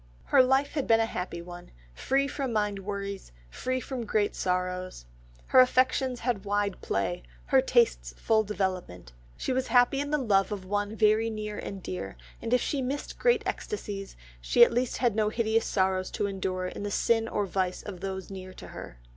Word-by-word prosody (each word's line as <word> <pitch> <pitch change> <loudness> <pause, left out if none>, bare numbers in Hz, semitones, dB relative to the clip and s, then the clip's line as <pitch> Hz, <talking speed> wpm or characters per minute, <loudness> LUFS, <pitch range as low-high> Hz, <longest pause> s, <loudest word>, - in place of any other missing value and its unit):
Her - - +5
life 265 +2 +2
had 285 -4 -2
been 225 0 +5
a 225 - +3
happy 180 -5 -5
one, 175 0 -10 0.2
free 275 - +1
from 275 -3 -3
mind 210 -2 0
worries, 200 - -5 0.2
free 255 0 -2
from 255 -1 -5
great 210 -1 0
sorrows, 180 - -2 0.4
her 260 - +7
affections 255 0 +3
had 230 -5 -1
wide 205 -1 -1
play, 95 -5 -1 0.2
her - - +4
tastes - - +2
full 220 -1 +3
development; 185 - -3 0.3
she - - -2
was 260 0 0
happy 245 +2 +4
in 285 0 -2
the 300 - +2
love 205 -7 +2
of 195 -3 -4
one 205 +2 -2
very 220 +1 +3
near 215 -1 -5
and 195 -2 -6
dear, 185 - -5 0.2
and 230 - -4
if 250 -1 +4
she 280 - -1
missed 270 +3 -4
great 485 -1 +3
ecstasies, 200 - -5 0.2
she 240 - +6
at - - -3
least 245 +1 0
had 240 -5 +1
no 215 -1 +2
hideous 225 0 +1
sorrows 185 -1 +1
to - - -2
endure 190 -2 -2
in 180 - -5
the 205 - -3
sin 225 +2 +2
or 210 -2 -1
vice 185 -1 -2
of 195 -4 -7
those 190 0 -5
near 185 -1 -8
to - - -10
her. - - -9
210 Hz, 190 wpm, -28 LUFS, 190-245 Hz, 0.4 s, her